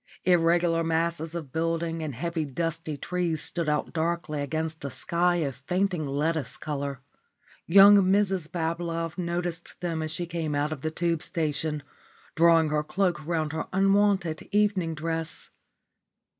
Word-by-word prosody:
Irregular 170 Hz, -1 st, +3 dB
masses 165 Hz, 0 st, -1 dB
of 155 Hz, -6 st, -6 dB
buildings 165 Hz, +1 st, -1 dB
and 145 Hz, -5 st, -4 dB
heavy 170 Hz, +4 st, -2 dB
dusty 160 Hz, +1 st, -3 dB
trees 170 Hz, 0 st, -1 dB
stood 170 Hz, -3 st, 0 dB
out 150 Hz, 0 st, -1 dB
darkly 165 Hz, -2 st, -1 dB
against 160 Hz, +2 st, -3 dB
a 140 Hz, -, -3 dB
sky 175 Hz, +5 st, +1 dB
of 145 Hz, -7 st, -2 dB
fainting 180 Hz, -4 st, 0 dB
lettuce 145 Hz, 0 st, -1 dB
colour. 140 Hz, -3 st, -4 dB, 0.7 s
Young 200 Hz, +3 st, +9 dB
Mrs 190 Hz, -3 st, +2 dB
Bablove 165 Hz, 0 st, -3 dB
noticed 175 Hz, -1 st, -3 dB
them 165 Hz, -3 st, -2 dB
as 155 Hz, -, -3 dB
she 165 Hz, +2 st, -3 dB
came 165 Hz, -3 st, -3 dB
out 145 Hz, +1 st, 0 dB
of 150 Hz, -4 st, -5 dB
the 155 Hz, -, -1 dB
Tube 165 Hz, 0 st, -1 dB
station, 150 Hz, -2 st, -2 dB, 0.5 s
drawing 165 Hz, -1 st, +5 dB
her 150 Hz, 0 st, 0 dB
cloak 175 Hz, -1 st, 0 dB
round 160 Hz, -1 st, -1 dB
her 160 Hz, -, -3 dB
unwonted 195 Hz, -3 st, +2 dB
evening 200 Hz, -5 st, +1 dB
dress. 165 Hz, 0 st, -4 dB
165 Hz, 145 wpm, -27 LUFS, 155-175 Hz, 0.7 s, Young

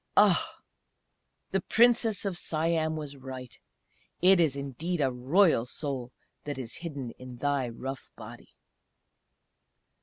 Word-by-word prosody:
Ah! -, -, +4 dB, 0.9 s
the 195 Hz, -, +1 dB
Princess 230 Hz, -1 st, +3 dB
of 195 Hz, -3 st, -1 dB
Siam 160 Hz, -1 st, 0 dB
was 145 Hz, -2 st, -6 dB
right. 130 Hz, -2 st, -9 dB, 0.6 s
It 185 Hz, +1 st, +6 dB
is 155 Hz, -5 st, +3 dB
indeed 145 Hz, +6 st, -3 dB
a 135 Hz, -3 st, +2 dB
Royal 130 Hz, +1 st, +3 dB
Soul 130 Hz, -3 st, -3 dB, 0.3 s
that 145 Hz, -2 st, -4 dB
is 125 Hz, -3 st, -2 dB
hidden 140 Hz, -8 st, -5 dB
in 130 Hz, -1 st, -9 dB
thy 140 Hz, -1 st, 0 dB
rough 135 Hz, +3 st, -6 dB
body!" 115 Hz, +2 st, -12 dB
145 Hz, 120 wpm, -29 LUFS, 130-170 Hz, 0.9 s, It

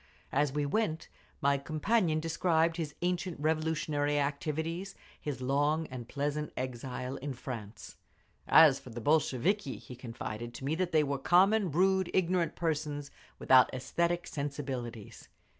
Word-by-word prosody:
As 145 Hz, 0 st, +2 dB
we 145 Hz, +1 st, -1 dB
went 160 Hz, 0 st, -1 dB, 0.3 s
my 140 Hz, 0 st, +3 dB
companion 155 Hz, +3 st, +1 dB
described 165 Hz, 0 st, +1 dB
his 155 Hz, -4 st, -4 dB
ancient 180 Hz, -1 st, -1 dB
revolutionary 155 Hz, -1 st, 0 dB
activities, 160 Hz, +6 st, -2 dB, 0.3 s
his 140 Hz, -4 st, -4 dB
long 145 Hz, +4 st, +1 dB
and 125 Hz, -3 st, -7 dB
pleasant 145 Hz, +1 st, -2 dB
exile 130 Hz, +1 st, -4 dB
in 140 Hz, -1 st, -5 dB
France…. 115 Hz, -5 st, -8 dB, 0.5 s
As 150 Hz, -4 st, +7 dB
for -, -, -12 dB
the 120 Hz, 0 st, -6 dB
Bolsheviki, 150 Hz, -, +1 dB
he 125 Hz, -, -11 dB
confided 120 Hz, -1 st, -6 dB
to 130 Hz, -, -7 dB
me 145 Hz, -, 0 dB
that 180 Hz, +2 st, -1 dB
they 155 Hz, -1 st, +4 dB
were 140 Hz, -1 st, -2 dB
common, 190 Hz, +6 st, +4 dB
rude, 190 Hz, +3 st, +2 dB
ignorant 180 Hz, -2 st, +1 dB
persons, 150 Hz, -3 st, -2 dB, 0.3 s
without 130 Hz, -1 st, +5 dB
aesthetic 170 Hz, +6 st, -1 dB
sensibilities. 130 Hz, -6 st, -5 dB
150 Hz, 135 wpm, -31 LUFS, 135-165 Hz, 0.5 s, As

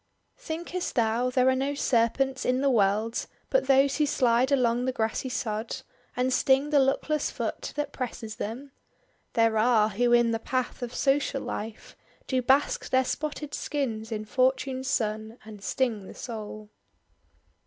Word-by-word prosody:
"Thinkest 345 Hz, +3 st, -4 dB
thou 235 Hz, +2 st, +2 dB
there 255 Hz, 0 st, +2 dB
are 260 Hz, -, +5 dB
no 275 Hz, +2 st, -1 dB
serpents 265 Hz, +1 st, +1 dB
in 255 Hz, +1 st, +1 dB
the 275 Hz, -1 st, +3 dB
world 215 Hz, +1 st, +1 dB, 0.2 s
But -, -, +2 dB
those 275 Hz, 0 st, +4 dB
who 300 Hz, -1 st, +2 dB
slide 250 Hz, -1 st, +2 dB
along 245 Hz, -2 st, +2 dB
the 260 Hz, -, +1 dB
grassy 225 Hz, +2 st, -2 dB
sod, 220 Hz, -1 st, -3 dB, 0.4 s
And 255 Hz, +1 st, +1 dB
sting 270 Hz, +3 st, +3 dB
the 290 Hz, -, +5 dB
luckless 275 Hz, +3 st, +1 dB
foot -, -, -4 dB
that 295 Hz, 0 st, -3 dB
presses 230 Hz, -3 st, -5 dB
them? 250 Hz, +7 st, -5 dB, 0.6 s
There 225 Hz, -1 st, +3 dB
are, 220 Hz, -2 st, +4 dB
who 240 Hz, +4 st, +1 dB
in 240 Hz, -1 st, +5 dB
the 225 Hz, -, -1 dB
path 255 Hz, +2 st, -2 dB
of 245 Hz, 0 st, -5 dB
social 275 Hz, 0 st, +1 dB
life 215 Hz, +1 st, -6 dB, 0.3 s
Do 260 Hz, -1 st, 0 dB
bask 265 Hz, +3 st, +2 dB
their 260 Hz, 0 st, +3 dB
spotted 300 Hz, +1 st, -4 dB
skins 230 Hz, -7 st, -3 dB
in 215 Hz, -1 st, -3 dB
fortune's 260 Hz, +2 st, 0 dB
son, 220 Hz, -2 st, -1 dB
And 210 Hz, -2 st, -11 dB
sting 225 Hz, -7 st, -1 dB
the -, -, -11 dB
soul." 215 Hz, -2 st, -7 dB
250 Hz, 155 wpm, -27 LUFS, 225-270 Hz, 0.6 s, are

